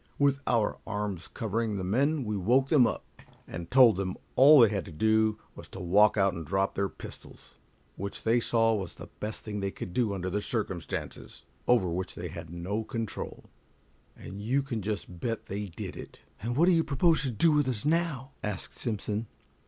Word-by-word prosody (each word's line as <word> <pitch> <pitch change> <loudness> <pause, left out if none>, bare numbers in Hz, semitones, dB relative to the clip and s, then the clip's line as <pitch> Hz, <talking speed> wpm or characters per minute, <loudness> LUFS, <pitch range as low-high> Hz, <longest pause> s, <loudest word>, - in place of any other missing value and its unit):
With 140 -1 +3
our 115 -4 +1
arms 105 -5 -3
covering 110 -1 -2
the 95 - -3
men, 135 +10 +1
we 105 -2 -2
woke 125 +8 +2
them 135 -7 +6
up, - - -4 0.4
and 85 0 -7
told 125 -6 +6
them 95 -1 -2 0.2
all 145 +3 +8
they 115 - +7
had 100 -2 -2
to - - -10
do 110 +5 +2 0.2
was - - -11
to - - -10
walk 100 +5 +4
out 95 -2 +3
and 85 -2 -5
drop 95 +6 0
their 100 0 -1
pistols, - - -12 0.4
which 100 +1 -5
they 115 +2 +3
saw 115 -1 +2
was 95 -5 -3
the - - -10
best 105 0 -5
thing 105 -1 -4
they 100 0 -1
could 90 -2 -7
do 110 -3 +1
under 95 +2 -2
circumstances 100 -5 -4 0.2
over 120 -7 +4
which 90 +2 -3
they 90 0 -5
had 85 0 -8
no 90 +6 -3
control, 115 0 -5 0.7
and 100 +1 -8
you 130 +6 +1
can 120 -5 -3
just 100 -3 -4
bet 115 +4 -3
they 100 +1 -4
did 85 - -7
it." - - -10 0.2
"And 120 +3 -2
what 165 - +5
do 185 - +5
you 165 -2 +4
propose 160 +3 +2
to 135 - -1
do 140 +8 +3
with 150 -2 +2
us 125 -3 -2
now?" 150 -5 0
asked 105 -3 -5
Simpson. 110 -1 -2
110 Hz, 195 wpm, -29 LUFS, 95-125 Hz, 0.7 s, all